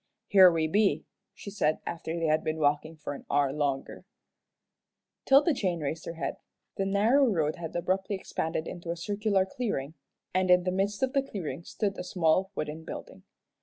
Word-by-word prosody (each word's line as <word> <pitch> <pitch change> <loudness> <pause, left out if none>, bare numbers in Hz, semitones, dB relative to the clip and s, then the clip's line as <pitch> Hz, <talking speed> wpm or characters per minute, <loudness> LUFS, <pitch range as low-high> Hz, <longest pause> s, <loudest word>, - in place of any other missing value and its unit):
"Here 190 -2 +8
we 165 -1 +1
be," 200 +6 +2 0.3
she 200 - -8
said, 155 -6 +1
after 165 0 -4
they 165 - -1
had 155 0 +2
been 155 0 -2
walking 150 +1 +1
for 150 -1 -5
an 140 - -9
hour 140 -2 +2
longer. 140 -2 -2 1.2
'Tilda 285 +5 +5
Jane 185 -9 -1
raised 155 +2 -4
her 165 - -5
head. 165 - -3 0.4
The 195 - 0
narrow 225 +8 +4
road 155 -3 0
had 165 -1 -7
abruptly 190 +3 0
expanded 160 -3 -3
into 170 -1 -7
a 170 - -2
circular 205 +1 +1
clearing, 190 - -3 0.4
and 185 0 +1
in 180 0 +6
the 185 - 0
midst 200 +4 -1
of 260 0 +1
the 275 - +3
clearing 195 - -6
stood 200 -3 -2
a - - -3
small 180 +1 +2
wooden 155 0 -4
building. - - -9
175 Hz, 180 wpm, -29 LUFS, 155-200 Hz, 1.2 s, Here